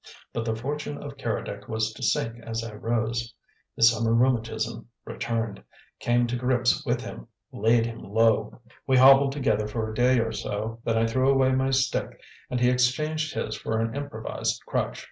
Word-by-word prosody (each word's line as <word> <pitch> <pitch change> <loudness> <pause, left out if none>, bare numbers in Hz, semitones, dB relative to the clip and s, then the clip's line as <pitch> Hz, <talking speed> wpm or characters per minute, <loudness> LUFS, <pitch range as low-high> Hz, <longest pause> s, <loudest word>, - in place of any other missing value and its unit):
But 115 - -2
the 110 -1 -1
fortune 145 +5 -4
of 140 -1 -8
Keredec 105 -4 -4
was 110 -1 -1
to 110 - -12
sink 115 -1 0
as 115 0 -4
I 115 -2 -7
rose. 115 +2 -2 0.4
His 115 0 +6
summer 115 0 +1
rheumatism 115 -2 0 0.2
returned, 115 -4 -3 0.4
came 120 0 +2
to 120 +1 -2
grips 125 +2 +1
with 120 -3 -1
him, - - -8 0.2
laid 115 +2 +2
him 115 0 -6
low. 110 +2 +1 0.3
We 130 -1 +4
hobbled 135 +1 +7
together 110 -7 0
for 110 0 -3
a - - -7
day 125 +3 +3
or 115 -1 0
so, 110 +2 -4
then 115 -1 +1
I 115 - +3
threw 130 +4 +2
away 135 -1 +4
my 130 +1 +1
stick 135 -1 0 0.3
and 125 - -1
he 125 0 +4
exchanged 150 +5 0
his 110 - -2
for 110 0 -2
an 115 +1 -1
improvised 140 -6 -3
crutch. - - -2
115 Hz, 180 wpm, -26 LUFS, 110-130 Hz, 0.4 s, hobbled